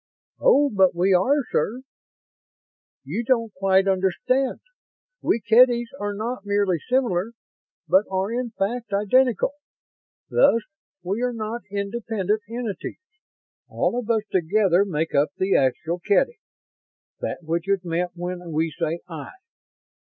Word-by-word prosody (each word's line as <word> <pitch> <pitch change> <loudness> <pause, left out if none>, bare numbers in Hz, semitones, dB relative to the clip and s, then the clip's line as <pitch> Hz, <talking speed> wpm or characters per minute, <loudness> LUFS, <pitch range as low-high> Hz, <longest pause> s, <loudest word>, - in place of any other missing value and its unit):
"Oh, 290 - +4
but 190 -3 +4
we 185 +3 +3
are, 270 +11 +3
sir. 245 +5 0 1.2
You 235 - -3
don't 230 -3 +1
quite 190 0 +2
understand. 195 +8 +1 0.6
We - - +1
Kedys 240 +2 +4
are 205 0 -3
not 225 +1 -4
merely 200 -4 +1
similar, 230 - 0 0.5
but 195 +3 +4
are 190 +2 -1
in 245 +1 -2
fact 220 +2 -3
identical. 235 +5 +2 0.8
Thus 230 - +4 0.4
we 195 +6 -2
are 250 0 0
not 225 +1 -4
independent 205 0 -2
entities. 230 -3 -5 0.7
All - - 0
of 235 -2 -7
us 220 -2 +2
together 190 +1 +3
make 165 -4 -2
up 145 +2 +2
the 190 +1 +1
actual 160 +6 +1
Kedy 320 - +1 0.8
that - - -4
which 170 +3 -2
is 195 -2 +1
meant 175 +1 -1
when 175 0 -5
we 160 +1 0
say 165 +2 -3
'I'. 160 - -8
200 Hz, 130 wpm, -23 LUFS, 180-235 Hz, 1.2 s, Oh